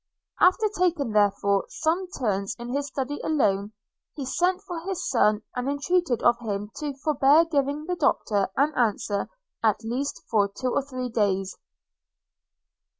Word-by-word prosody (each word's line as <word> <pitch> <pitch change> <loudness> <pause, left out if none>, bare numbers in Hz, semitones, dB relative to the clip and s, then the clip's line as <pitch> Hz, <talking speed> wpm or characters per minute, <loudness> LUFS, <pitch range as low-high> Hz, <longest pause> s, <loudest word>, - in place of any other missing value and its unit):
After 370 +5 +4
taking, 345 -9 +1
therefore, 200 -1 +2
some 340 +4 -1
turns 205 - -2
in 240 0 -7
his 285 0 -1
Study 275 +1 -4
alone, 205 -9 +1 0.4
he 280 - -5
sent 360 +7 +1
for 350 -3 -5
his 375 +2 -4
son, 215 -4 +2
and 250 +2 -2
entreated 285 -2 0
of 240 0 +4
him 210 -2 -4
to 295 -3 -4
forbear 300 +2 +5
giving 290 -1 -1
the 360 +1 -2
Doctor 205 - +1
an 295 +3 +3
answer 210 -4 0 0.3
at 220 0 +2
least 250 +5 -3
for 205 -3 +2
two 250 +5 -3
or - - +2
three 255 -2 -5
days. 195 -4 0
260 Hz, 150 wpm, -25 LUFS, 210-305 Hz, 0.4 s, forbear